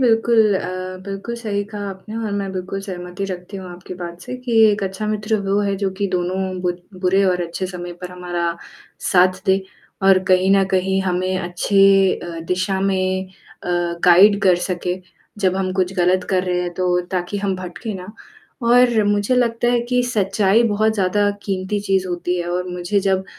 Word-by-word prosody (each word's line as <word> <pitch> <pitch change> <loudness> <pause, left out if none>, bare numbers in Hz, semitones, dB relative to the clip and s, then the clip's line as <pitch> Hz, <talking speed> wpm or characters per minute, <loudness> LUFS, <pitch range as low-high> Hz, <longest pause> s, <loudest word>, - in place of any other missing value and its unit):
बिल्कुल 225 -3 +4
अ, 185 0 -5
बिल्कुल 200 +4 -5
सही 205 -3 -2
कहा 205 -1 -5
आपने 195 +3 -8
और 220 -2 -3
मैं 200 -1 -2
बिल्कुल 190 +1 -4
सहमति 180 0 -6
रखती 180 +2 -7
हूँ 185 -1 -8
आपकी 180 +1 -9
बात 175 -1 -7
से 250 +4 -6
कि 250 -1 -6 0.2
एक 205 0 -1
अच्छा 190 +3 -4
मित्र 215 +1 0
वो 200 +1 +2
है 200 -1 0
जो 195 -1 -1
कि 200 - +1
दोनों 180 +1 -1 0.2
बु 180 - +1 0.3
बुरे 190 +1 +3
और 180 -1 +1
अच्छे 185 +2 -4
समय 175 -1 -7
पर 180 - -6
हमारा 175 -1 -3 0.6
साथ 185 0 +4
दे 190 0 +3 0.4
और 195 -1 +6
कहीं 185 +1 +4
न 195 - +4
कहीं 190 +1 +1
हमें 185 0 0
अच्छे 195 +2 +3
अ, 170 -1 -7
दिशा 190 +1 0
में 190 -1 0
अ, 185 -1 -14 0.4
गाइड 200 +4 +7
कर 185 -2 +5
सके 180 0 -2 0.4
जब 190 -2 +2
हम 185 -1 -1
कुछ 185 -1 0
गलत 180 +1 +2
कर 185 -1 +2
रहे 180 -1 0
हैं 175 -1 -3
तो 180 0 +1
ताकि 185 +2 -2
हम 195 -1 -1
भटके 185 +4 -6
ना 180 -1 -7 0.6
और 240 -2 +5
मुझे 205 +3 +1
लगता 240 -1 +1
है 240 - +2
कि 250 0 +3
सच्चाई 205 -2 +2
बहुत 215 +1 +2
ज़्यादा 205 +1 +2
क़ीमती 195 +1 -2
चीज़ 190 -2 0
होती 175 0 -2
है 175 - -4
और 180 +1 -2
मुझे 180 +3 -1
जब 190 -1 +1
190 Hz, 185 wpm, -20 LUFS, 180-205 Hz, 0.6 s, गाइड